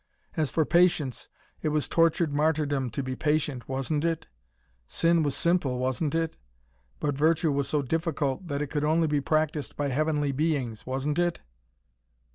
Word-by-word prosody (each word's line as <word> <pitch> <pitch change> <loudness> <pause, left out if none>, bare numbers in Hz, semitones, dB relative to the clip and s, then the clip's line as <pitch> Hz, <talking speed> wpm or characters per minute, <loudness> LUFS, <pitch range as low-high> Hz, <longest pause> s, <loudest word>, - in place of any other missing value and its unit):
As 155 -3 +1
for 160 +3 +1
patience, 170 -7 +2 0.3
it 155 - 0
was 150 -1 0
tortured 165 -2 +2
martyrdom 145 -3 +1
to 135 +5 -3
be 130 0 -3
patient, 150 -4 -1
wasn't 135 +3 -1
it? 165 -1 -1 0.6
Sin 170 - +2
was 145 -3 0
simple, 170 -7 +1
wasn't 130 +4 -1
it? 165 -1 -1 0.6
But 145 -1 0
virtue 160 +2 +2
was 140 -1 -1
so 150 -1 +1
difficult 160 +1 -1
that 145 -1 -1
it 145 - -7
could 150 -1 -1
only 160 +2 +3
be 150 -2 +1
practised 155 -1 -1
by 145 -1 0
heavenly 150 +1 +1
beings, 135 -7 -1
wasn't 135 +4 -1
it? 175 - 0
150 Hz, 160 wpm, -27 LUFS, 140-160 Hz, 0.6 s, only